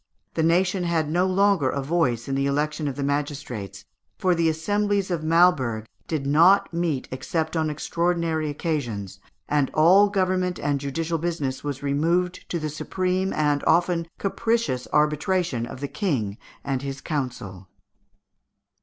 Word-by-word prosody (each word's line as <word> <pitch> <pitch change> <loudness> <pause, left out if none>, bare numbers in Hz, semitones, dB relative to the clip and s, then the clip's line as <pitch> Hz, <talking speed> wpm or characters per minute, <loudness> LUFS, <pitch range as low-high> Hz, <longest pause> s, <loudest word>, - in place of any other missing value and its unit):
The 160 - 0
nation 180 +3 +2
had 165 -3 0
no 180 +3 +2
longer 190 -6 +3
a 140 0 -2
voice 135 -7 0
in 135 - -2
the 135 +1 +1
election 150 +2 -1
of 140 - -3
the 140 - -3
magistrates, 140 - -3 0.3
for 185 -1 +2
the 165 -1 +2
assemblies 200 +4 0
of 170 -3 -1
Malberg 155 -10 +3 0.2
did 155 -4 -2
not 170 +7 +5
meet 165 -6 -1
except 160 +5 -2
on 160 -1 +1
extraordinary 165 0 -1
occasions, 120 - -3 0.3
and 145 -3 +1
all 185 +6 +6
government 185 -2 0
and 145 -1 -1
judicial 160 +4 -2
business 150 -6 -2
was 145 -1 -4
removed 170 +6 0
to 175 - -1
the 155 -2 -3
supreme 185 +4 -1
and 145 -2 +1
often 170 -1 +2
capricious 225 - -1
arbitration 150 -4 +1
of 130 - -9
the 140 - -2
King 125 - -2 0.2
and 135 -2 -2
his 140 0 -5
council. 120 - -4
155 Hz, 145 wpm, -24 LUFS, 140-175 Hz, 0.3 s, all